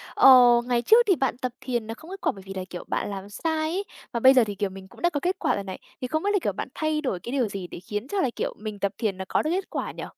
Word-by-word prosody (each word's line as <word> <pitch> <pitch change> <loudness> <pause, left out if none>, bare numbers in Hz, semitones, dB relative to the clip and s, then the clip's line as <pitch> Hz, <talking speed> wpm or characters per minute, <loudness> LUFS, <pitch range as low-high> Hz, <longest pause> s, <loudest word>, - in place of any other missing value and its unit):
ờ, 245 -2 +8
ngày 240 -1 +1
trước 460 - +6
thì 380 - +5
bạn 265 -3 -1
tập 255 -1 -3
thiền 240 -4 -2
nó 225 - -4
không 315 +9 -13
kết 390 +1 -8
quả - - +2
bởi 195 - -12
vì 195 - -7
là, 190 - -4
kiểu, 175 - -7
bạn - - -2
làm 195 0 -6
sai 320 +10 -2 0.2
ấy, 380 +4 -1 0.3
và 235 - -1
bây 260 +3 +7
giờ 255 -2 +6
thì, 205 -2 -4
kiểu, 200 0 -1
mình 190 0 -11
cũng - - -16
đã 345 - +4
có 290 - -2
kết 360 +6 -1
quả - - +1
rồi - - -3
này, 190 -1 -7 0.2
thì 255 - -2
không 315 +6 -1
biết 405 - +1
là, 405 - +3
kiểu, 205 - -1
bạn - - -4
thay 310 -1 0
đổi 225 - -2
cái 235 - -7
điều 260 -4 +1
gì 195 -3 -5
để - - -9
khiến 210 +6 -5
cho 395 +5 -1
là, 265 - +2
kiểu, - - -2
mình 215 -1 -6
tập 200 -1 0
thiền 205 -5 -1
nó 190 - -5
có - - +1
được 310 - -2
kết 380 +1 -2
quả - - -3
nhỉ? - - -7
240 Hz, 335 wpm, -25 LUFS, 200-310 Hz, 0.3 s, ờ